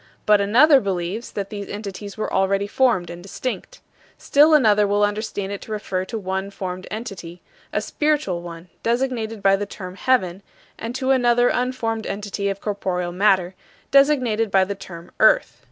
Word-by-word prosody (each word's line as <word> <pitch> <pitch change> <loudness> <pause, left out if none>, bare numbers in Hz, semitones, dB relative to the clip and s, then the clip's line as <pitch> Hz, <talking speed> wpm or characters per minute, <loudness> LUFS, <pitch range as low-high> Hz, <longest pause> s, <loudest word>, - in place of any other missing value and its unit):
But 210 -1 +5
another 265 +9 +6
believes 195 +3 -3
that 200 0 -4
these 205 -1 -6
entities 205 0 -7
were 215 - -3
already 195 +1 +1
formed 205 -5 +1
and 175 0 -9
distinct. 255 - -6 0.4
Still 300 +2 +5
another 210 -7 +4
will 205 +1 +2
understand 205 -1 -2
it 200 - -5
to - - -10
refer 190 -3 -3
to 225 +4 -5
one 190 -1 -3
formed 185 -2 -6
entity 195 -6 -7 0.3
a - - 0
spiritual 295 - -1
one, 170 0 -10
designated 230 -3 -1
by 195 0 +5
the 205 +1 -4
term 185 -2 -8
"heaven" 190 -4 0 0.4
and 230 +2 -5
to 265 0 0
another 245 -2 +3
unformed 240 -3 -2
entity 200 0 -3
of 195 0 -4
corporeal 185 -4 -2
matter, 185 -1 +2 0.4
designated 255 -6 +3
by 195 -1 +4
the 195 +2 -3
term 175 -3 -11
"earth." - - +4
205 Hz, 165 wpm, -22 LUFS, 190-235 Hz, 0.4 s, another